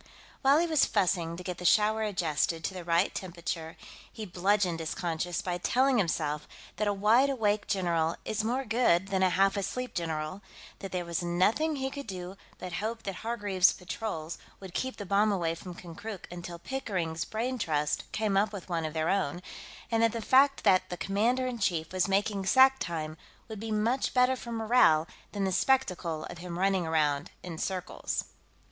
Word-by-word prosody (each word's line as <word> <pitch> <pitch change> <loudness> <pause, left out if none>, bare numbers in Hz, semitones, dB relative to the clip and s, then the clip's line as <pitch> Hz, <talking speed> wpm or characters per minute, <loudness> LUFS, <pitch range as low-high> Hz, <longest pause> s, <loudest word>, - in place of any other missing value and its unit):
While 275 +1 +5
he 335 - +3
was 315 -4 +3
fussing 175 -5 +1
to 180 - -7
get 180 0 -5
the - - -7
shower 215 +4 +4
adjusted 165 -5 0
to 190 - -2
the 180 -2 -6
right 170 +3 +2
temperature, 170 -2 -5 0.3
he 220 - -7
bludgeoned 185 -1 +1
his 160 -1 -3
conscience 170 0 -2
by 180 -1 -2
telling 255 +5 +3
himself 150 -5 -1 0.3
that 215 - 0
a - - +3
wide 215 +7 +4
awake 215 -5 0
general 170 -5 +1
is 215 0 -1
more 250 +4 -1
good 195 -7 +2
than 190 -1 0
a 185 - +5
half 195 +2 +3
asleep 250 +5 -3
general, 160 +1 -3 0.4
that 195 -1 -7
there 180 -1 -2
was 170 +1 -2
nothing 190 - +2
he 265 -1 -2
could 280 -3 -7
do 185 -1 -6 0.2
but 180 -1 -7
hope 225 +1 -3
that 195 -2 -4
Hargreaves's 205 -5 +2
patrols 180 -3 -5 0.2
would 190 -3 -10
keep 260 +5 -2
the 205 - -6
bomb 205 +2 +3
away 170 -4 0
from 175 +1 -9
Konkrook 180 +4 -8
until 175 0 -7
Pickering's 175 -8 -3
brain 245 +3 -3
trust 150 -6 -1
came 215 -2 0
up 200 +2 +3
with 195 -3 -8
one 165 -2 -1
of 155 0 -5
their 160 0 0
own, 175 -5 0 0.5
and 225 0 +2
that 230 -1 +3
the 230 - -2
fact 270 +5 +4
that 185 -2 +4
the 180 - -4
commander 230 +8 +1
in 250 -2 -3
chief 170 -5 -1
was 185 0 +2
making 195 0 0
sack 265 +3 +6
time 155 -2 -4 0.3
would 220 -2 -7
be 225 +1 -5
much 230 +6 0
better 250 +1 +4
for 240 -2 -8
morale 220 -9 +4 0.2
than 200 -1 -2
the 190 - +1
spectacle 180 -7 +1
of 175 - -8
him 175 -1 -6
running 190 -2 +1
around 150 -3 +1
in 165 -3 -6
circles. 185 -2 -3
190 Hz, 190 wpm, -29 LUFS, 170-220 Hz, 0.5 s, sack